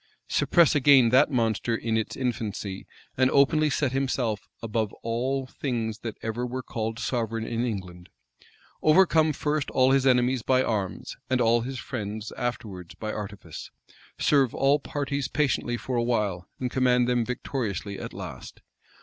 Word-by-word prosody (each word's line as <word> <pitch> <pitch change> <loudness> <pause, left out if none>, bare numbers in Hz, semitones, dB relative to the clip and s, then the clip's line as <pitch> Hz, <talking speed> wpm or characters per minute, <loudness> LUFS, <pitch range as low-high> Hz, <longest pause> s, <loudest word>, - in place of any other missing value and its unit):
Suppress 170 -4 +4
again 140 -4 +6
that 130 +5 +5
monster 115 -3 0
in 115 0 -1
its 110 -1 -1
infancy, 105 -6 -3 0.3
and 130 0 +3
openly 150 +3 +4
set 140 -2 0
up - - -7
himself 130 -6 -1 0.2
above 110 -2 -1
all 130 +4 -1
things 115 -5 -3
that 115 -2 -6
ever 115 +2 -2
were 125 +1 -4
called 115 -1 -4
sovereign 115 -2 -2
in 115 +1 -2
England? 95 -6 -5 0.7
Overcome 160 -1 +5
first 150 0 -1
all 130 +1 +3
his 135 0 +3
enemies 125 0 +3
by 130 +2 +2
arms, 105 -6 -3
and 130 -1 +2
all 115 0 +3
his 130 +3 -5
friends 110 -3 -5
afterwards 105 -8 -5
by 110 -1 -4
artifice? 100 -6 -7 0.5
Serve 135 -5 +3
all 140 +2 +3
parties 140 -1 -3
patiently 125 -4 0
for 125 +1 -3
a 120 - +2
while, 105 -7 -1
and 125 -1 -2
command 125 -1 +3
them 125 -1 +2
victoriously 110 -5 -3
at - - -6
last? - - -9
120 Hz, 155 wpm, -26 LUFS, 110-135 Hz, 0.7 s, again